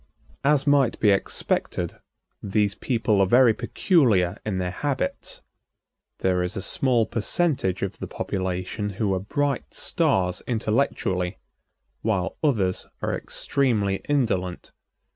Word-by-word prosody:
As 140 -1 +3
might 140 -4 +3
be 105 - +4
expected, 100 - -1 0.4
these 100 0 +1
people 110 -3 +1
are 95 - +4
very 120 +2 +6
peculiar 120 - +2
in 105 -3 -2
their 90 -1 -2
habits. 135 -2 -3 0.8
There 90 -1 +2
is 90 +4 -2
a - - -2
small 125 -4 +2
percentage 115 - 0
of 100 - -4
the - - -5
population 95 +2 -3
who 105 -4 +1
are 95 - 0
bright 140 +7 -2
stars 90 -1 +1
intellectually, 105 -6 0 0.6
while 100 -5 -1
others 105 -11 +1 0.2
are - - 0
extremely 110 -8 0
indolent. 95 -11 -1
105 Hz, 120 wpm, -24 LUFS, 95-130 Hz, 0.8 s, very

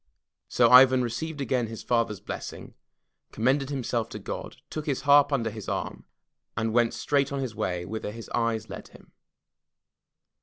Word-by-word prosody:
So 120 -1 +3
Ivan 130 0 +8
received 145 +6 -4
again 125 -2 0
his 115 -1 -8
father's 115 -4 0
blessing, - - -7 0.6
commended 130 +5 +1
himself 125 -4 -2
to - - -7
God, - - -6 0.2
took 155 -1 -5
his 140 -3 -1
harp 145 0 +5
under 115 -5 0
his 110 -1 -7
arm, - - -4 0.5
and 110 -1 -1
went 120 0 +2
straight 140 +3 0
on 140 - -2
his 130 -4 -3
way 90 -5 -2
whither 110 +1 -5
his 115 +2 -9
eyes 115 -2 -1
led - - -8
him. - - -18
120 Hz, 160 wpm, -27 LUFS, 110-135 Hz, 0.6 s, Ivan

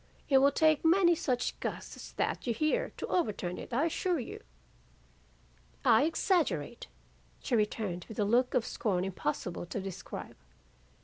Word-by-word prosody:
It 270 -2 +6
will 280 +1 +5
take 310 +1 +3
many 345 +1 +5
such 250 -6 0
a - - -26
gust - - -5
as - - -10
that - - -2
you 235 - +1
hear, 310 - 0
to - - -3
overturn 200 - -1
it, - - -9
I 265 +7 +2
assure 350 +2 0
you.' 240 - -7 1.4
"'I 230 +5 +6
exaggerate!' 315 - 0 0.6
she 255 - +1
returned 210 -5 -1
with 220 - -8
a 210 - +2
look 245 +4 +2
of 230 - +2
scorn 185 -4 -1
impossible 175 -1 -3
to 205 - -4
describe. 195 -2 -7
240 Hz, 160 wpm, -31 LUFS, 195-310 Hz, 1.4 s, It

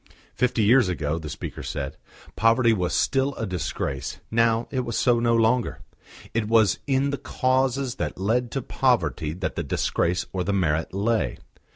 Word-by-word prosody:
Fifty 125 -2 +1
years 115 -1 +5
ago, 80 -2 -2
the 80 -2 -7
speaker - - -6
said, 70 -1 -4 0.4
poverty 115 +1 +4
was 90 -4 -1
still 135 0 +1
a 115 - -3
disgrace, 90 - -3
now 115 0 +2
it 130 - -1
was 120 -3 -2
so 120 -2 +3
no 115 0 +2
longer. 115 +2 +1 0.5
It 110 -2 0
was 110 -2 +3
in 135 +1 +1
the 140 - -3
causes 130 0 0
that 75 -4 -3
led 115 +6 0
to 135 - -2
poverty 120 - 0
that 90 +2 -3
the - - -3
disgrace 85 +4 0
or 95 -1 -1
the 100 - -1
merit 80 -4 0
lay. 110 +4 0
115 Hz, 170 wpm, -25 LUFS, 90-125 Hz, 0.5 s, years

